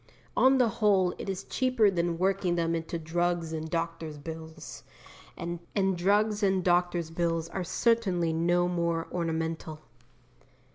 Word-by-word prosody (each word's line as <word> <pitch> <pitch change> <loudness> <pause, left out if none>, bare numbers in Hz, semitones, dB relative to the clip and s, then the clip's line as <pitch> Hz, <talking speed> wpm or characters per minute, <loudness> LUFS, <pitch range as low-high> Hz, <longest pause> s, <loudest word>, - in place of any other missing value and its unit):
On 265 +1 +5
the 250 -2 +4
whole 190 -4 +4
it - - -5
is 190 -1 -3
cheaper 255 -6 +2
than 170 -2 -1
working 185 -1 +1
them 165 -1 0
into 165 +1 -3
drugs 170 0 -1
and 160 0 -4
doctors' 165 -2 -3
bills, 160 -5 -8 0.6
and 170 0 -4 0.4
drugs 205 +4 +2
and 190 -2 +2
doctors' 175 -2 +1
bills 165 -1 -1
are 185 +1 -3
certainly 185 -5 +1
no 175 +2 +2
more 170 -2 -1
ornamental. 165 -2 -3
175 Hz, 135 wpm, -29 LUFS, 165-190 Hz, 0.6 s, On